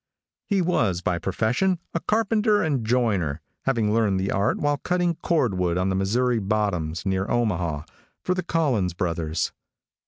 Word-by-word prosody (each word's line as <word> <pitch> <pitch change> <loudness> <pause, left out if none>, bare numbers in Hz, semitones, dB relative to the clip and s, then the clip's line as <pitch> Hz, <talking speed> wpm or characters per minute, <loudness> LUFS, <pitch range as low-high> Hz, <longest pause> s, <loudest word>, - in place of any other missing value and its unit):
He 195 -4 +2
was, 110 - +1
by 85 -1 0
profession, 115 - +1 0.2
a 170 - 0
carpenter 215 +1 +2
and 140 -7 0
joiner, 105 - +1 0.3
having 115 -6 +1
learned 105 -4 +2
the 95 +1 -1
art 100 +2 +1
while 145 0 +1
cutting 180 +2 0
cordwood 95 - +1
on 90 +1 +1
the 95 - 0
Missouri 115 +5 +1
bottoms, 95 -6 -1
near 95 0 0
Omaha, 90 -10 0 0.4
for 180 - +1
the 185 - -1
Collins 125 - 0
Brothers. 85 -3 -1
110 Hz, 150 wpm, -24 LUFS, 90-145 Hz, 0.4 s, He